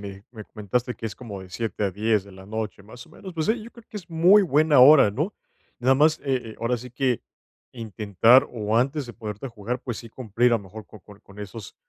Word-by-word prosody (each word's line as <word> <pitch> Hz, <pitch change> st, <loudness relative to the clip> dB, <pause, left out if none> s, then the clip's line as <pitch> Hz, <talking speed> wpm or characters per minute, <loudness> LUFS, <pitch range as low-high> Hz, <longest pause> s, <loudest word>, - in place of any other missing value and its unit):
Me 100 Hz, 0 st, -9 dB
me 110 Hz, -3 st, -10 dB
comentaste 120 Hz, +3 st, -3 dB
que 115 Hz, -, -11 dB
es 105 Hz, -, -6 dB
como 105 Hz, -6 st, -9 dB
de 95 Hz, -, -14 dB
7:00 110 Hz, +1 st, -3 dB
a 100 Hz, -, 0 dB
10:00 105 Hz, +1 st, 0 dB
de 100 Hz, -, -15 dB
la 95 Hz, 0 st, -13 dB
noche, 105 Hz, -2 st, -5 dB
más 120 Hz, +4 st, -12 dB
o -, -, -21 dB
menos, 190 Hz, -3 st, -11 dB
pues, 160 Hz, -1 st, -2 dB
sí, 220 Hz, 0 st, 0 dB
yo 235 Hz, -, -11 dB
creo 235 Hz, -2 st, -16 dB
que 215 Hz, -, -9 dB
es 175 Hz, -1 st, -15 dB
muy 175 Hz, +6 st, +5 dB
buena 155 Hz, -5 st, +4 dB
hora, 135 Hz, -5 st, +8 dB
¿no? 155 Hz, -, -3 dB, 0.4 s
Nada 130 Hz, +2 st, +3 dB
más, 155 Hz, +3 st, +3 dB
eh 125 Hz, -5 st, -2 dB
eh, -, -, -14 dB
ahora 120 Hz, +2 st, 0 dB
sí 125 Hz, +2 st, -10 dB
que, 125 Hz, -1 st, -1 dB, 0.5 s
intentar, 110 Hz, +2 st, +3 dB
o 110 Hz, -2 st, -2 dB
antes 135 Hz, +3 st, 0 dB
de 120 Hz, -, -9 dB
ponerte 105 Hz, +1 st, -7 dB
a -, -, -6 dB
jugar, 115 Hz, +2 st, -5 dB
pues, 120 Hz, -4 st, -5 dB
sí 115 Hz, -, -10 dB
cumplir, 120 Hz, +1 st, 0 dB
a 115 Hz, -, +4 dB
lo 100 Hz, -, -8 dB
mejor, 105 Hz, +3 st, -11 dB
co 110 Hz, -, -15 dB
con 100 Hz, +2 st, -16 dB
con 100 Hz, +1 st, -17 dB
esos 105 Hz, 0 st, -9 dB
115 Hz, 255 wpm, -24 LUFS, 105-135 Hz, 0.5 s, hora